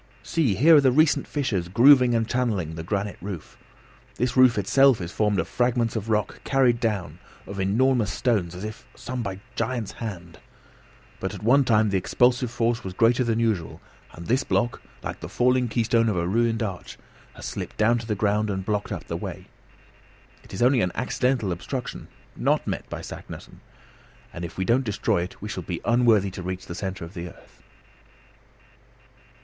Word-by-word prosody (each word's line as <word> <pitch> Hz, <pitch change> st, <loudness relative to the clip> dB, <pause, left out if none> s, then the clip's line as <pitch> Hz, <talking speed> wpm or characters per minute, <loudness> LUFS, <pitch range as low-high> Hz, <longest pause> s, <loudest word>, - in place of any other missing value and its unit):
See 120 Hz, -, +1 dB
here 155 Hz, -, +7 dB
are 130 Hz, -, +5 dB
recent 155 Hz, +4 st, +3 dB
fissures 110 Hz, -, -1 dB
grooving 125 Hz, +4 st, +6 dB
and 115 Hz, -1 st, +1 dB
channelling 110 Hz, -11 st, -1 dB
the 80 Hz, -, -5 dB
granite 100 Hz, +4 st, -3 dB
roof. 95 Hz, -3 st, -7 dB, 0.6 s
This 125 Hz, 0 st, -1 dB
roof 130 Hz, -3 st, +6 dB
itself 135 Hz, +5 st, +4 dB
is 85 Hz, -1 st, -5 dB
formed 105 Hz, -1 st, +1 dB
of -, -, -1 dB
fragments 120 Hz, -2 st, 0 dB
of 110 Hz, 0 st, -4 dB
rock 105 Hz, -1 st, -1 dB
carried 130 Hz, -4 st, +2 dB
down, 105 Hz, -7 st, -2 dB, 0.3 s
of 100 Hz, 0 st, -7 dB
enormous 110 Hz, +2 st, +2 dB
stones, 95 Hz, -7 st, 0 dB
as 90 Hz, -, -7 dB
if 110 Hz, +3 st, -8 dB
by -, -, -21 dB
some 110 Hz, -7 st, -5 dB
giant's 120 Hz, -5 st, -2 dB
hand; 90 Hz, -7 st, -8 dB, 0.8 s
but 95 Hz, +2 st, -4 dB
at 100 Hz, -, -10 dB
one 135 Hz, +5 st, +5 dB
time 110 Hz, -4 st, +3 dB
the 95 Hz, -, +2 dB
expulsive 125 Hz, +5 st, +2 dB
force 115 Hz, 0 st, -1 dB
was 95 Hz, -1 st, -6 dB
greater 115 Hz, +4 st, +3 dB
than 115 Hz, -1 st, 0 dB
usual, 110 Hz, -8 st, -1 dB, 0.3 s
and 85 Hz, -, -10 dB
this 130 Hz, +6 st, +1 dB
block, 120 Hz, -2 st, -1 dB, 0.2 s
like -, -, -5 dB
the -, -, -7 dB
falling 125 Hz, 0 st, +2 dB
keystone 115 Hz, 0 st, +2 dB
of 100 Hz, -, -1 dB
a 85 Hz, 0 st, 0 dB
ruined 115 Hz, +3 st, +1 dB
arch, 95 Hz, -5 st, -6 dB, 0.4 s
has -, -, -9 dB
slipped -, -, -6 dB
down 115 Hz, +2 st, +3 dB
to 115 Hz, -, -8 dB
the 105 Hz, -, -1 dB
ground 105 Hz, +1 st, +1 dB
and 95 Hz, -1 st, -3 dB
blocked 105 Hz, -1 st, -2 dB
up -, -, -4 dB
the -, -, -5 dB
way. -, -, -6 dB, 1.0 s
It -, -, -17 dB
is 95 Hz, -, -1 dB
only 125 Hz, -1 st, +4 dB
an 90 Hz, -, 0 dB
accidental 125 Hz, -4 st, 0 dB
obstruction, 120 Hz, +9 st, -5 dB, 0.3 s
not -, -, +1 dB
met -, -, -4 dB
by -, -, -5 dB
Saknussemm, -, -, -10 dB, 0.7 s
and 85 Hz, -, -7 dB
if 85 Hz, -, -7 dB
we 95 Hz, -, -1 dB
don't 120 Hz, +6 st, +2 dB
destroy 105 Hz, -5 st, 0 dB
it 90 Hz, +2 st, -7 dB
we -, -, -4 dB
shall 95 Hz, -, -4 dB
be 85 Hz, 0 st, -5 dB
unworthy 115 Hz, -5 st, +3 dB
to 90 Hz, -, -7 dB
reach 95 Hz, +1 st, -5 dB
the -, -, -7 dB
centre 95 Hz, -1 st, -5 dB
of 85 Hz, -, -12 dB
the 85 Hz, 0 st, -6 dB
earth." -, -, -19 dB
110 Hz, 185 wpm, -25 LUFS, 95-125 Hz, 1.0 s, here